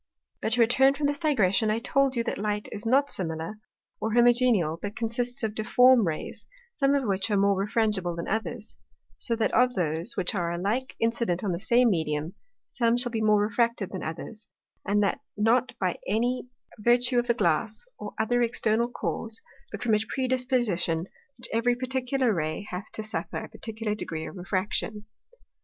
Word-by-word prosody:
But 220 - 0
to 245 - +3
return 265 +4 +4
from 290 +1 -2
this 285 +1 0
digression, 220 - +2
I 215 - +1
told 270 +3 +1
you, 235 - 0
that 230 - -3
Light 210 0 -2
is 215 +2 -5
not 275 +4 +3
similar, 165 +4 -3 0.4
or 220 +1 -2
homogeneal, 240 -9 +3
but 205 +1 -5
consists 240 +3 -2
of 215 -1 -1
difform 235 +1 +5
Rays, 155 -1 -5 0.3
some 275 -5 +2
of 280 - +1
which 195 -1 -1
are 205 - +2
more 200 0 +3
refrangible 200 -3 0
than 170 - -5
others: 220 +1 -4 0.4
So 235 - -1
that 225 - 0
of 250 0 +3
those, 165 -2 -1
which 180 - 0
are 175 -4 -1
alike 205 +10 -2
incident 230 -5 0
on 200 - 0
the 170 - -2
same 240 +3 +3
Medium, 160 -1 -1 0.4
some 235 -1 +2
shall 245 0 +1
be 225 -1 -2
more 210 -1 +4
refracted 230 -1 0
than 190 - -5
others, 210 +7 -7 0.4
and 205 +1 +2
that 200 - 0 0.2
not 230 +4 +2
by 185 -2 -1
any 245 +5 0 0.3
virtue 245 +3 +4
of 240 - -2
the 235 - +2
Glass, 210 - 0
or 210 - -7
other 245 +3 +2
external 230 0 +1
Cause, 225 -2 -4 0.3
but 210 - -6
from 230 -3 +2
a 210 - +4
predisposition, 250 -10 0 0.4
which 235 - -3
every 235 +2 +2
particular 255 -1 0
Ray 155 +3 -2
hath 185 +4 -6
to 215 - -4
suffer 215 - -4
a - - -6
particular 220 -1 -4
degree 160 -6 -5
of - - -9
Refraction. 195 +3 -2
220 Hz, 180 wpm, -27 LUFS, 195-245 Hz, 0.4 s, difform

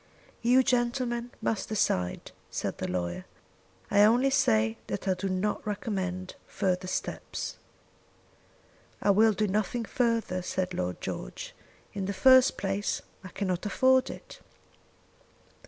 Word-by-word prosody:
"You, 250 +3 +5
gentlemen, 240 -1 0
must 220 -3 -1
decide," 90 - 0 0.2
said - - -4
the - - -2
lawyer. 90 0 -3 0.7
"I 205 - +5
only 240 +6 +5
say 110 - +2
that 105 - -4
I 190 - +4
do 190 +1 -3
not 190 +3 -1
recommend 190 -3 -3
further 185 -2 -1
steps." - - -4 1.4
"I 205 - +3
will 215 +2 +5
do 210 +1 0
nothing 215 +4 -1
further," 230 -7 0
said 185 0 -2
Lord 90 - -3
George. - - -6 0.4
"In 195 -2 -3
the 200 - -2
first 260 +6 +6
place 195 +2 -2 0.2
I - - -7
cannot 185 -1 -2
afford 260 +4 +3
it." - - -10
200 Hz, 125 wpm, -28 LUFS, 185-235 Hz, 1.4 s, first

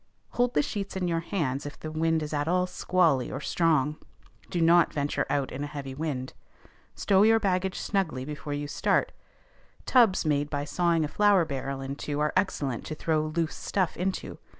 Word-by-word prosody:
_ - - -20
Hold 245 0 +2
the 150 - +4
sheets 200 +3 -4
in 185 -1 -1
your 165 -1 0
hands 150 -6 -2
if 145 - -10
the 155 - -6
wind 160 0 +1
is 150 - -5
at 145 0 -1
all 180 +1 +2
squally 180 -6 +1
or 135 - -4
strong. 150 -2 +1 0.5
Do 175 - -2
not 170 0 +5
venture 145 0 -1
out 140 -2 0
in 135 +3 -4
a - - -3
heavy 140 -2 -6
wind. 135 -3 -4 0.6
Stow 195 -1 +3
your 225 +1 +5
baggage 190 -2 0
snugly 165 -10 -1
before 145 0 -5
you 145 0 -3
start: - - +1 0.7
tubs 230 -9 +4
made 145 -1 +1
by 145 -1 -2
sawing 170 0 +1
a - - -2
flour 200 +1 +3
barrel 135 -1 -4
in 135 +1 -4
two 145 0 -4
are 150 0 +1
excellent 145 - 0
to 155 - -4
throw 155 0 0
loose 160 +1 -1
stuff 185 -3 -1
into. 185 +2 -3
155 Hz, 195 wpm, -27 LUFS, 145-180 Hz, 0.7 s, not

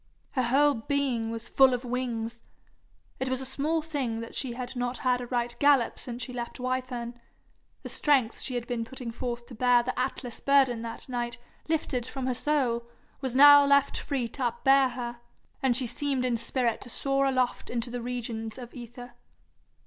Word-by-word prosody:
Her 260 - 0
whole 280 +4 +4
being 245 -2 -1
was 230 0 -5
full 265 -2 +5
of 250 +1 -6
wings. 235 -2 -3 0.8
It 260 - -1
was 260 0 0
a 265 - -3
small 300 +5 -1
thing 270 -8 -2
that 230 - -8
she 255 -3 -2
had 250 +1 -6
not 245 0 -2
had 250 -1 +1
a 245 - -6
right 240 -1 -1
gallop 285 -4 +4
since 245 0 -5
she 250 - -6
left 240 0 -5
Wyfern; 250 -2 -3 0.6
the - - -6
strength 265 -7 +2
she 255 - -3
had 240 -1 -2
been 240 -2 -2
putting 245 0 -7
forth 240 0 -4
to 245 - -12
bear 245 +1 +4
the 255 +1 -3
Atlas 250 -2 -3
burden 270 -4 +3
that 230 -1 -7
night 240 -2 -3 0.3
lifted 260 -6 -1
from 265 0 -4
her 255 - +1
soul, 245 -4 0 0.3
was 260 -2 -2
now 285 +1 +9
left 280 0 +3
free 270 -5 -2
to 260 +3 -4
upbear 270 +3 +4
her, 240 -1 -5 0.4
and 255 -3 +3
she 260 - 0
seemed 255 +2 -1
in 245 -2 +1
spirit 235 0 -1
to 245 - -9
soar 275 +3 +1
aloft 255 -2 0
into 240 0 -3
the 245 0 -4
regions 230 -2 -4
of 245 -2 -9
aether. 245 0 -9
250 Hz, 185 wpm, -28 LUFS, 235-265 Hz, 0.8 s, now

